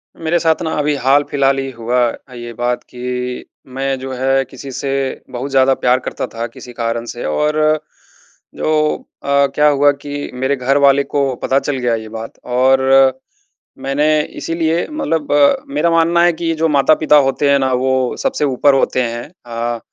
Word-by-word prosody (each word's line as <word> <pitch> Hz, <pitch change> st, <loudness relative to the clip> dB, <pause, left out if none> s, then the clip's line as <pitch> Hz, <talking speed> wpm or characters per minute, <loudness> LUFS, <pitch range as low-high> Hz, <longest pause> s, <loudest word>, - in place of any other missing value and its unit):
मेरे 165 Hz, +1 st, 0 dB
साथ 160 Hz, -1 st, +1 dB
ना 160 Hz, -, -2 dB
अभी 150 Hz, 0 st, +1 dB
हाल-फिलहाल 140 Hz, 0 st, +2 dB
ही 135 Hz, 0 st, -3 dB
हुआ 120 Hz, +1 st, -1 dB
अ, 130 Hz, +2 st, -11 dB
ये 120 Hz, -1 st, -7 dB
बात 120 Hz, +1 st, -2 dB
कि 125 Hz, 0 st, -5 dB, 0.3 s
मैं 135 Hz, 0 st, -1 dB
जो 130 Hz, 0 st, -6 dB
है 135 Hz, +1 st, +1 dB
किसी 135 Hz, +1 st, -10 dB
से 135 Hz, +2 st, -4 dB, 0.4 s
बहुत 130 Hz, +2 st, -5 dB
ज़्यादा 135 Hz, 0 st, +4 dB
प्यार 125 Hz, 0 st, +2 dB
करता -, -, -5 dB
था 115 Hz, 0 st, -5 dB
किसी 120 Hz, +2 st, -12 dB
कारण 115 Hz, 0 st, -3 dB
से 120 Hz, +1 st, -7 dB
और 150 Hz, -, 0 dB, 1.0 s
जो -, -, -2 dB, 0.5 s
अ, 140 Hz, 0 st, +3 dB
क्या 150 Hz, 0 st, +4 dB
हुआ 145 Hz, 0 st, +4 dB
कि 145 Hz, 0 st, -5 dB
मेरे 130 Hz, +2 st, 0 dB
घर 135 Hz, +1 st, +1 dB
वाले 140 Hz, 0 st, +4 dB
को 140 Hz, -2 st, -1 dB
पता 135 Hz, -, +2 dB
चल 140 Hz, -1 st, -3 dB
गया 120 Hz, -2 st, 0 dB
ये 110 Hz, -1 st, -7 dB
बात 115 Hz, +1 st, -8 dB
और 130 Hz, +2 st, +3 dB, 1.0 s
मैंने 140 Hz, +3 st, +1 dB, 0.3 s
इसीलिए 165 Hz, 0 st, -1 dB
मतलब 165 Hz, -, -2 dB, 0.4 s
मेरा 280 Hz, -12 st, +1 dB
मानना 165 Hz, +1 st, +3 dB
है 175 Hz, -, +5 dB
कि 170 Hz, +1 st, -6 dB
ये 165 Hz, -, +1 dB
जो 165 Hz, -, +4 dB
माता-पिता 150 Hz, +2 st, +3 dB
होते 135 Hz, +2 st, +1 dB
हैं 140 Hz, -, +5 dB
ना 130 Hz, -1 st, 0 dB
वो 130 Hz, 0 st, 0 dB
सबसे 270 Hz, -, -1 dB
ऊपर 140 Hz, +1 st, +3 dB
होते 130 Hz, -1 st, +1 dB
हैं 120 Hz, +2 st, -5 dB, 0.2 s
अ, 120 Hz, 0 st, -3 dB
135 Hz, 180 wpm, -17 LUFS, 125-145 Hz, 1.0 s, है